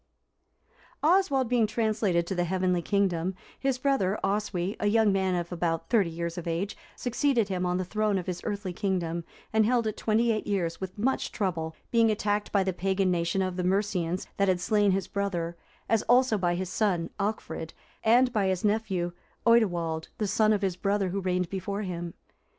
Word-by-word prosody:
D.] - - -45 0.4
Oswald 310 -9 +3
being 235 -2 +3
translated 215 -6 +1
to 190 - -3
the 175 -1 0
heavenly 180 0 +1
kingdom, 190 -2 0 0.2
his 270 -2 0
brother 255 -8 +1
Oswy,(355) 195 -1 -1
a 210 - +1
young 215 0 +4
man 190 -1 +1
of 175 0 -3
about 165 0 -2
thirty 205 -8 +4
years 170 +1 -4
of 170 - -8
age, 170 +5 -2 0.2
succeeded 245 -3 +1
him 180 -1 -1
on 180 0 0
the 185 - -2
throne 215 +1 0
of 180 - -3
his 180 -1 -4
earthly 200 -4 -3
kingdom, 175 -4 -1 0.3
and 220 0 +5
held 235 +1 +2
it 215 -1 -1
twenty 230 +2 +2
eight 215 -1 -2
years 185 -5 -1
with 190 +1 -6
much 255 +6 0
trouble, 165 -5 -2 0.2
being 230 -1 +4
attacked 210 -1 0
by 200 -2 +3
the 190 -1 -1
pagan 190 +1 +1
nation 170 +2 +1
of 185 -1 -3
the 180 - -1
Mercians, 185 -2 0
that 200 - +2
had 185 -1 +2
slain 205 +3 +2
his 190 -1 0
brother, 175 -4 -2 0.3
as 225 -2 +3
also 250 -1 +5
by 175 -3 +1
his 180 0 -3
son 185 -6 0
Alchfrid,(356) 200 -5 -3 0.3
and 245 +3 +5
by 205 -4 +2
his 185 +1 0
nephew 200 -5 0 0.3
Oidilwald,(357) 175 -9 +2
the 210 - -1
son 215 +2 +3
of 205 -1 +1
his 190 -2 0
brother 200 0 0
who 195 +2 -2
reigned 180 -1 0
before 200 +2 -3
him. 175 -2 -5
195 Hz, 190 wpm, -28 LUFS, 175-215 Hz, 0.4 s, and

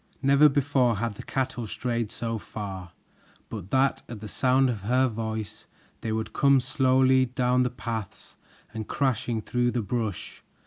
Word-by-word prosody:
Never 140 +2 +6
before 135 -4 +2
had 115 +1 -2
the - - -9
cattle 125 -3 -3
strayed 115 -1 -2
so 115 -1 -3
far 95 -5 -7 0.6
but 100 -4 -7
that 135 +3 +2
at 115 -3 -7
the 110 - -7
sound 130 +4 +2
of 115 -5 -2
her 125 +6 +2
voice 110 -3 -5 0.3
they 110 - -3
would 110 0 -3
come 140 -2 +4
slowly 130 -1 +3
down 125 0 +1
the 125 - +2
paths 115 -4 -6 0.4
and 110 -1 -5
crashing 120 -4 -1
through 120 +2 +1
the 120 -2 -1
brush. 110 -3 -4
120 Hz, 155 wpm, -26 LUFS, 110-130 Hz, 0.6 s, Never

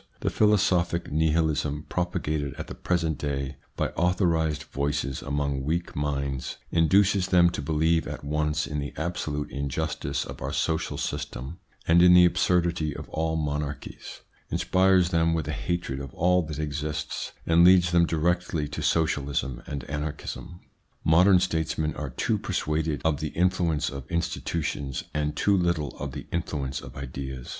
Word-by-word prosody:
The - - 0
philosophic 90 -5 +2
Nihilism, 75 -1 +1
propagated 80 -5 -2
at - - -6
the - - -8
present 85 -4 -1
day 70 -1 -3 0.2
by - - 0
authorised 85 -4 +1
voices 70 -1 -2
among 70 -1 -1
weak 85 +4 -2
minds, 70 -2 -2
induces 95 +3 +4
them 85 -1 +5
to - - -4
believe 80 +2 +1
at - - -6
once 75 +1 0
in 75 -1 -3
the 70 0 -5
absolute 80 -3 -3
injustice 70 0 -2
of - - -9
our - - -3
social 80 -1 -1
system 70 +8 -4 0.3
and 85 +1 +6
in 90 0 +8
the 90 0 +8
absurdity 85 -3 +1
of - - -8
all 80 0 -1
monarchies, 75 -2 -4 0.3
inspires 95 -1 +3
them 85 -1 +2
with 80 -3 -2
a - - -1
hatred 85 -3 -2
of 70 -2 -7
all 90 +1 +3
that 75 -2 -5
exists, 75 0 -3
and 85 +1 +5
leads 90 -1 +6
them 85 -1 +4
directly 85 -1 0
to 75 - -5
socialism 70 -5 0
and 70 -3 -4
anarchism. 80 +4 -5 0.4
Modern 90 +4 +6
statesmen 80 -3 -1
are 75 -2 -4
too - - -1
persuaded 75 -3 -1
of 75 -3 +2
the 80 - -2
influence 85 -4 +1
of 70 -2 -8
institutions 80 -5 -2
and 75 -1 -1
too 100 +6 +3
little 85 -7 0
of 70 -2 -4
the - - -6
influence 70 -6 -2
of 65 - -11
ideas. 65 -2 -6
80 Hz, 150 wpm, -26 LUFS, 70-85 Hz, 0.4 s, in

